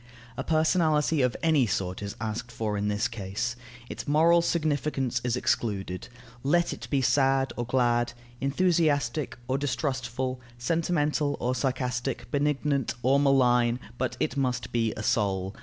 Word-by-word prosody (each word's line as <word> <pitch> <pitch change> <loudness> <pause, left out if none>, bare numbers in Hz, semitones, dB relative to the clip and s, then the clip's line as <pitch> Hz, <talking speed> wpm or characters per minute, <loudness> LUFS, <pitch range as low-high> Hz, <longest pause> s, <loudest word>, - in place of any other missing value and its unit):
A - - -3
personality 155 -2 +2
of 125 -2 +1
any 155 -7 +4
sort 95 -1 -2
is 100 -1 -5
asked 115 +2 -4
for 110 -2 -2
in 100 0 -1
this 105 +3 +1
case; 115 +2 -3 0.3
its - - -7
moral 165 +4 +5
significance 145 -6 0
is 125 -1 0
excluded: 95 -7 -1 0.3
let 170 +6 +2
it - - -8
be 135 -2 +1
sad 135 +2 +2
or 120 -1 -3
glad, 120 -2 +2 0.3
enthusiastic 145 -3 +1
or 130 +2 0
distrustful, 130 -2 -2 0.2
sentimental 150 +1 0
or 125 +1 0
sarcastic, 125 0 -2
benignant 145 -3 0
or 135 +3 +4
malign, 125 -3 +3 0.2
but 125 - -1
it 155 - -1
must 125 -3 -1
be 115 -2 +1
a 105 - -4
soul. 95 -3 0
130 Hz, 140 wpm, -27 LUFS, 120-145 Hz, 0.3 s, moral